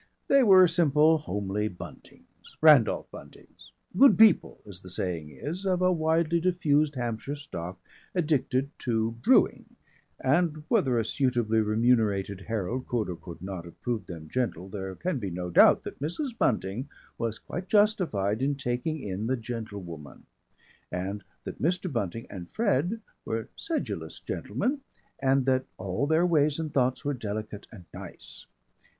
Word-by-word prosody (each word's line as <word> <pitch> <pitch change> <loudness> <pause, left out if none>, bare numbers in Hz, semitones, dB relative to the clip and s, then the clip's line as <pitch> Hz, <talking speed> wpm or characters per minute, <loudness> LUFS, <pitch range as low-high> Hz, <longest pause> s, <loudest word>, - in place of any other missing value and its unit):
They 275 0 +6
were 190 -6 +7
simple 160 -1 +4
homely 105 -6 -2
Buntings 90 -4 -12
Randolph 150 -8 +5
Buntings - - -14 0.2
"good 270 +8 +7
people" 220 -1 +5
as 100 -3 -11
the 95 - -11
saying 85 -4 -3
is 155 - -6
of 185 -2 +1
a 185 - +4
widely 165 0 +2
diffused 155 -4 +2
Hampshire 120 +3 -3
stock 95 - -7 0.4
addicted 140 -5 +1
to 115 -2 0
brewing, - - +3 0.4
and 155 +2 +1
whether 130 -4 +2
a 115 - +1
suitably 120 -4 +1
remunerated 105 -3 +1
herald 115 +3 -2
could 115 -5 -1
or - - -5
could 85 0 -11
not 95 -3 -5
have 85 - -13
proved 120 -3 -3
them 80 -3 -8
"gentle" 115 -5 -2
there 95 -1 -5
can 175 - -2
be 100 -4 -3
no 90 0 -5
doubt - - +6
that - - -8
Mrs. 230 - -3
Bunting 120 - -1 0.3
was 115 -2 -2
quite 180 +3 -7
justified 175 - +2
in 140 +1 +1
taking 135 +4 -2
in 100 +2 -3
the 130 +1 0
Gentlewoman, 100 - -7 0.7
and 95 +3 -4 0.2
that - - -8
Mr. 180 +2 0
Bunting 115 -1 -3
and 90 -3 -9
Fred 210 - 0 0.2
were 110 -1 -3
sedulous 325 -2 -4
gentlemen, 275 +3 -2 0.4
and 135 -1 +2
that 130 -1 +2
all 95 +9 -2
their 160 +3 +3
ways 150 -4 +2
and 160 -2 -4
thoughts 130 +2 +1
were 145 - 0
delicate 105 -3 -5
and 95 -6 -12
nice. - - -11
125 Hz, 150 wpm, -28 LUFS, 100-155 Hz, 0.7 s, were